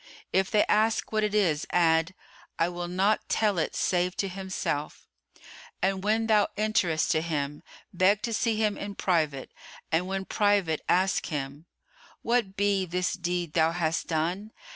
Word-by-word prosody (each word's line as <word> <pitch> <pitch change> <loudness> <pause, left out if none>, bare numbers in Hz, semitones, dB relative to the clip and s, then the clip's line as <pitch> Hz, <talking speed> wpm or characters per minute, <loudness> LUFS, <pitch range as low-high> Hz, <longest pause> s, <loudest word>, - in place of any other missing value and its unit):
If 190 0 +2
they 210 - +3
ask 220 +1 +1
what 215 -1 +1
it 210 0 0
is, 165 -8 +1
add, 165 +1 +2 0.4
'I 165 - +2
will 175 0 -5
not 190 +4 0
tell 210 -5 +1
it 160 - -2
save 180 0 0
to 195 - 0
himself'; 190 -6 -4 0.7
and 190 0 0
when 220 +2 +1
thou 215 -2 +3
enterest 195 -7 +1
to 155 - +2
him, 150 -3 -3 0.3
beg 190 +3 +3
to 230 - -2
see 225 +1 +1
him 215 -1 0
in 200 0 -6
private 155 -9 0 0.4
and 170 +3 +1
when 190 0 -3
private 200 -7 +1
ask 185 +1 +2
him, 145 +1 -5 0.6
'What 230 -5 0
be 200 -2 +1
this 180 +1 -1
deed 175 -3 -3
thou 165 0 +3
hast 165 -2 -1
done? 175 +7 -2
185 Hz, 160 wpm, -27 LUFS, 165-205 Hz, 0.7 s, they